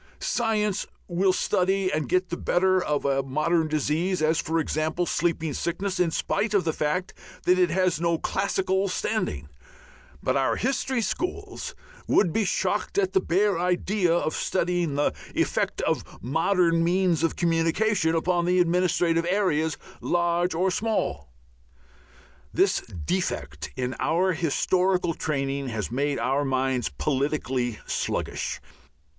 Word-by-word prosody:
Science 210 Hz, -4 st, 0 dB, 0.2 s
will 185 Hz, +2 st, +2 dB
study 185 Hz, 0 st, +1 dB
and 150 Hz, -4 st, -1 dB
get 185 Hz, 0 st, +1 dB
the 170 Hz, -, -2 dB
better 185 Hz, +1 st, +2 dB
of 150 Hz, -1 st, -1 dB
a 135 Hz, -1 st, +2 dB
modern 155 Hz, +5 st, +1 dB
disease, 155 Hz, +5 st, 0 dB
as, 155 Hz, +1 st, +2 dB
for 165 Hz, +1 st, 0 dB
example, 160 Hz, +2 st, -1 dB
sleeping 165 Hz, -3 st, 0 dB
sickness, 185 Hz, +6 st, -2 dB
in 180 Hz, -2 st, +3 dB
spite 205 Hz, +6 st, -1 dB
of 195 Hz, -, +3 dB
the 160 Hz, -, 0 dB
fact 155 Hz, +6 st, -1 dB, 0.3 s
that 180 Hz, +1 st, +3 dB
it 180 Hz, -1 st, +4 dB
has 180 Hz, -1 st, +1 dB
no 170 Hz, -1 st, +2 dB
classical 190 Hz, +1 st, 0 dB
standing; 130 Hz, -, -2 dB, 0.8 s
but -, -, +1 dB
our 135 Hz, -1 st, +2 dB
history 260 Hz, -1 st, 0 dB
schools 360 Hz, +10 st, -4 dB, 0.3 s
would 175 Hz, -6 st, +3 dB
be 225 Hz, -, +2 dB
shocked 200 Hz, -, -1 dB
at 390 Hz, -1 st, +1 dB
the 385 Hz, -, +5 dB
bare 195 Hz, +1 st, +1 dB
idea 180 Hz, +1 st, +1 dB
of 165 Hz, -2 st, +1 dB
studying 175 Hz, -4 st, 0 dB
the 145 Hz, -, +1 dB, 0.2 s
effect -, -, 0 dB
of -, -, 0 dB, 0.2 s
modern 165 Hz, -, +2 dB
means 175 Hz, -1 st, +2 dB
of 165 Hz, -, +1 dB
communication 165 Hz, +1 st, +1 dB
upon 175 Hz, +1 st, +1 dB
administrative 175 Hz, -1 st, +2 dB
areas, 160 Hz, -6 st, +1 dB, 0.2 s
large 175 Hz, 0 st, +1 dB
or 185 Hz, +3 st, +2 dB
small. 210 Hz, -, -1 dB, 1.2 s
This -, -, +2 dB, 0.2 s
defect 75 Hz, 0 st, -2 dB
in 130 Hz, 0 st, -2 dB
our 185 Hz, +3 st, +2 dB
historical 180 Hz, +2 st, +1 dB
training 140 Hz, -3 st, -2 dB
has 110 Hz, -2 st, -3 dB
made 140 Hz, +3 st, 0 dB
our 135 Hz, +3 st, +1 dB
minds 130 Hz, -3 st, 0 dB
politically 135 Hz, -5 st, -1 dB
sluggish. -, -, -2 dB
170 Hz, 135 wpm, -26 LUFS, 150-185 Hz, 1.2 s, the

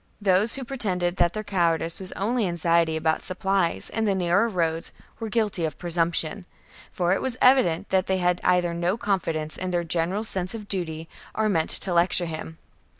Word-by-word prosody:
Those 200 Hz, +2 st, +3 dB
who 270 Hz, -, -5 dB
pretended 190 Hz, -9 st, -2 dB
that 175 Hz, -1 st, +2 dB
their 215 Hz, -, -4 dB
cowardice 170 Hz, -4 st, 0 dB
was 190 Hz, -1 st, -6 dB
only 220 Hz, +1 st, 0 dB
anxiety 170 Hz, -1 st, +1 dB
about 160 Hz, 0 st, 0 dB
supplies 190 Hz, -1 st, 0 dB
and 220 Hz, 0 st, -1 dB
the 200 Hz, -, +2 dB
narrow 185 Hz, +5 st, +2 dB
roads 165 Hz, -4 st, -1 dB, 0.3 s
were 225 Hz, -1 st, -4 dB
guilty 210 Hz, -5 st, 0 dB
of 155 Hz, -2 st, -2 dB
presumption; 170 Hz, +1 st, -1 dB, 0.5 s
for 175 Hz, 0 st, +1 dB
it -, -, -1 dB
was 255 Hz, -2 st, -3 dB
evident 220 Hz, -9 st, +4 dB
that 190 Hz, 0 st, +1 dB
they 190 Hz, -, +1 dB
either 180 Hz, 0 st, +2 dB
had 170 Hz, -, -4 dB
no 180 Hz, +5 st, 0 dB
confidence 165 Hz, -8 st, -1 dB
in 185 Hz, -, -3 dB
their 175 Hz, -1 st, 0 dB
general's 175 Hz, +6 st, -1 dB
sense 185 Hz, +2 st, -3 dB
of 210 Hz, -2 st, -8 dB
duty 165 Hz, -5 st, -3 dB, 0.3 s
or 220 Hz, 0 st, +1 dB
meant 165 Hz, -5 st, +1 dB
to 185 Hz, -, +2 dB
lecture 175 Hz, +1 st, +3 dB
him. 160 Hz, 0 st, -6 dB
180 Hz, 185 wpm, -25 LUFS, 170-200 Hz, 0.5 s, evident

